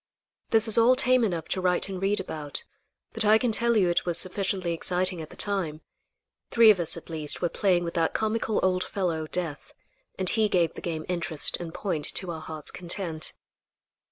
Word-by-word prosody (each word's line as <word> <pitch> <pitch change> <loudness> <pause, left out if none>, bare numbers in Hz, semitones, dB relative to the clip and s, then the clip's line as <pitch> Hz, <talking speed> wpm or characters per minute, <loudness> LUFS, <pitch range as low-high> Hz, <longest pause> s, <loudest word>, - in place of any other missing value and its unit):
This 225 0 +3
is 220 +1 +5
all 240 +3 +5
tame 255 -1 +3
enough 170 -7 -2
to 185 - -1
write 180 0 +1
and 190 -2 -6
read 200 +2 +1
about, 155 -6 -5 0.5
but 225 - +3
I 215 +1 +6
can 240 0 0
tell 235 +1 +3
you 190 -4 +3
it 175 - +1
was 175 -2 0
sufficiently 185 -1 0
exciting 180 +1 0
at 155 - -9
the - - -13
time. 180 -7 -2 0.7
Three 230 -2 +7
of 195 - 0
us 170 0 -2
at 165 - -11
least 155 -2 -1
were 175 - 0
playing 180 -2 +1
with 170 - -4
that 165 -2 0
comical 220 0 0
old 185 0 +2
fellow, 165 -5 -2
Death, 160 -4 -5 0.4
and 185 - -2
he 220 +2 +2
gave 175 -4 +1
the - - -9
game 160 -2 -4
interest 170 -4 0
and 170 -2 -7
point 180 -3 -3
to 180 -2 -3
our 160 -1 -6
hearts' 155 -1 -7
content. 170 -3 -2
180 Hz, 200 wpm, -26 LUFS, 165-205 Hz, 0.7 s, Three